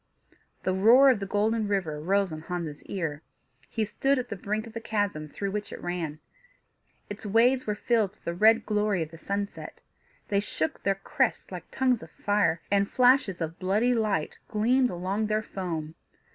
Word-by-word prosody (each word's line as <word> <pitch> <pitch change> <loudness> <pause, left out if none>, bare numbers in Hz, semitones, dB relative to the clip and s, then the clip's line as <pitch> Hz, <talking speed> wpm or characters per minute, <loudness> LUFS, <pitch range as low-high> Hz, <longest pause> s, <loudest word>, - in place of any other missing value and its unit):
The 185 - +1
roar 240 +8 +7
of 240 - 0
the 195 - -4
Golden 215 +2 +1
River 185 -7 -1
rose 195 +1 +1
on 155 - -6
Hans's 165 -3 -5
ear. 160 -6 -3 0.5
He 220 -2 -1
stood 270 +7 +1
at 250 -1 -3
the - - -3
brink 210 +3 -3
of 225 - -11
the 230 - -5
chasm 205 -9 -2
through 200 +6 -4
which 210 +1 -4
it - - -7
ran. 165 -4 -4 0.9
Its 205 +1 -8
waves 235 +5 +3
were 210 - 0
filled 215 -3 +1
with - - -30
the 170 - -2
red 220 +5 +4
glory 210 -4 +1
of 155 - -10
the 165 - -12
sunset: 200 +2 -5 0.5
they 200 - +2
shook 160 -6 -3
their 195 0 +1
crests 260 +4 -1
like 180 -2 -8
tongues 255 -3 +1
of - - -10
fire, 205 -5 +1
and 200 0 +2
flashes 250 -8 +3
of 165 +2 -4
bloody 210 +7 +2
light 210 -9 -1
gleamed 245 +4 +2
along 190 +5 -2
their 215 0 0
foam. 165 -6 -4
205 Hz, 185 wpm, -27 LUFS, 180-225 Hz, 0.9 s, roar